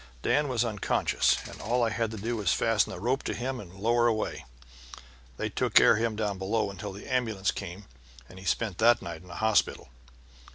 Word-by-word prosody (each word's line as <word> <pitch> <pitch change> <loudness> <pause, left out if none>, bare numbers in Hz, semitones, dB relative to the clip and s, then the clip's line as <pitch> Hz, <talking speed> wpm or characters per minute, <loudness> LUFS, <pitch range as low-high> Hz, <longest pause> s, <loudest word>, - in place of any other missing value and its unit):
Dan 145 0 +2
was 125 -3 0
unconscious, 105 -4 +1
and - - -10
all 120 +3 +1
I 115 - +1
had 115 0 -1
to 110 - -7
do 115 +4 -2
was 100 -6 +1
fasten 115 -2 +2
a - - -6
rope 125 +8 0
to - - -3
him 125 +3 -3
and 95 -6 -10
lower 115 +5 +2
away. 110 - -2 0.9
They - - -2
took - - -2
care - - +8
of 110 - -1
him 115 -2 0
down 105 -3 -2
below 105 +1 0
until 100 +1 -6
the 100 +2 -10
ambulance 110 -7 0
came, 95 +4 -7 0.4
and 95 - -13
he 95 - -12
spent 100 0 -1
that 120 +2 +5
night 85 -2 -6
in 90 - -16
a - - -8
hospital. 110 - +1
110 Hz, 210 wpm, -28 LUFS, 95-115 Hz, 0.9 s, care